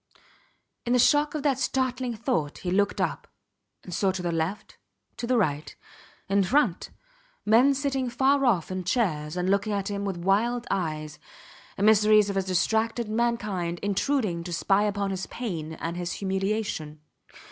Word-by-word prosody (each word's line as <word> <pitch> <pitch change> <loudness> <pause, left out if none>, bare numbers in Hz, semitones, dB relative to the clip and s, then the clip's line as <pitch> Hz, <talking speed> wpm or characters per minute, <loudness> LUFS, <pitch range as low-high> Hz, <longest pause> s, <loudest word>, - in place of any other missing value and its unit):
In 240 - 0
the - - +5
shock 295 +4 +3
of 300 - -3
that 275 -3 +1
startling 255 -2 -1
thought 215 - -2
he 180 - -4
looked 200 +2 +1
up, - - -2 0.6
and 180 - -8
saw 195 +3 +1
to 185 -1 -5
the 175 - -1
left, 165 +5 -3 0.4
to 235 - -4
the 250 0 +2
right, 150 -8 -1 0.5
in 195 0 +2
front, 210 - +1 0.6
men 245 +6 +5
sitting 270 -2 -1
far 270 +4 +2
off 195 -10 +2
in 185 0 -3
chairs 175 -7 -1
and 180 0 -1
looking 200 +2 +1
at 200 0 -2
him 200 0 -3
with 195 -3 -3
wild 220 +7 +1
eyes 155 -4 -3 0.6
emissaries 210 0 +5
of 195 - -3
a - - +3
distracted 220 +5 0
mankind 210 -7 -1
intruding 205 -3 0
to 175 - -7
spy 195 +4 +2
upon 200 -1 -1
his 190 -1 -4
pain 165 -10 -5
and 165 +2 -5
his 175 0 -3
humiliation. 190 -5 -2
200 Hz, 160 wpm, -26 LUFS, 180-235 Hz, 0.6 s, the